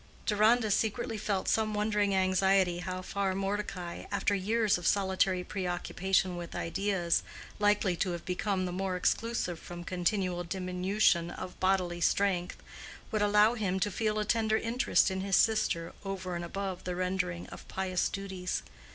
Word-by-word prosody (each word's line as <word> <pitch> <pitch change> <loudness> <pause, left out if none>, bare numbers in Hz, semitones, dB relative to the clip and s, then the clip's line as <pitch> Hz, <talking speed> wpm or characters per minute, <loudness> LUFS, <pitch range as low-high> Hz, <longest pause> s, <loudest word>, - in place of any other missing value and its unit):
Deronda 220 +1 +3
secretly 220 +2 0
felt 200 -2 -1
some 215 -1 +1
wondering 210 -1 +1
anxiety 190 -1 +3
how 185 +1 -4
far 195 0 -1
Mordecai, 195 -3 -3
after 200 0 +1
years 210 +1 +2
of 175 - -2
solitary 190 -2 +2
preoccupation 185 0 -1
with 170 -1 -7
ideas 180 -1 0 0.4
likely 205 -3 +3
to 185 - 0
have 170 -1 -5
become 185 +1 -1
the 180 - -3
more 190 +1 -2
exclusive 180 -2 0
from 175 0 -8
continual 180 0 -1
diminution 180 0 +1
of 180 +1 -8
bodily 185 -2 +1
strength, 180 0 +1 0.5
would 215 - 0
allow 210 +2 +5
him 195 -5 -1
to 205 +2 0
feel 215 +2 0
a 210 - 0
tender 220 0 +2
interest 230 -4 +2
in 190 0 -2
his 195 0 +1
sister 215 -7 +2
over 185 -2 -4
and 170 - -3
above 190 +1 -4
the 180 -1 -3
rendering 180 -1 -1
of - - -11
pious 185 -1 -1
duties. 190 -2 -4
190 Hz, 150 wpm, -30 LUFS, 180-205 Hz, 0.5 s, allow